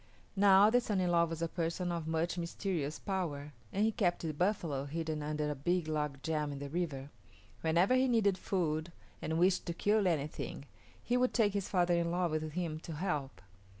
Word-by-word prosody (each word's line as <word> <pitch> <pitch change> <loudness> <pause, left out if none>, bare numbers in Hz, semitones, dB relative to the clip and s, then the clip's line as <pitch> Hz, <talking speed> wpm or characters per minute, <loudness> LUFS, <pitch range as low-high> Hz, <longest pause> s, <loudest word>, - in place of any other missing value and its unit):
Now, 200 +1 +6
the 245 +1 +4
son 210 -5 -1
in 180 -1 +1
law 170 -1 +4
was 165 0 -4
a - - +1
person 170 +1 -2
of 165 -2 -3
much 165 +2 0
mysterious 170 -3 -2
power, 150 -7 -3 0.2
and 205 +3 +1
he 225 - +2
kept 175 -6 0
the 160 -2 -2
buffalo 165 -5 0
hidden 155 +1 -3
under 150 0 -1
a - - 0
big 170 +4 0
log 150 -3 -2
jam 150 -1 -1
in 140 - -5
the 140 0 -6
river. 145 -4 -3 0.5
Whenever 170 +8 +3
he 255 +1 +4
needed 220 -6 +3
food 170 -4 -1 0.3
and 160 +1 -1
wished 180 +2 +2
to 170 - -1
kill 205 +1 +2
anything, 150 -3 -2 0.4
he 245 - +1
would 250 0 +1
take 210 -4 +3
his 200 -2 -2
father 180 -2 +2
in 170 0 +1
law 175 +1 +1
with 155 -1 -3
him 165 -3 -2
to 165 - -7
help. 145 - -3
170 Hz, 200 wpm, -33 LUFS, 155-190 Hz, 0.5 s, Now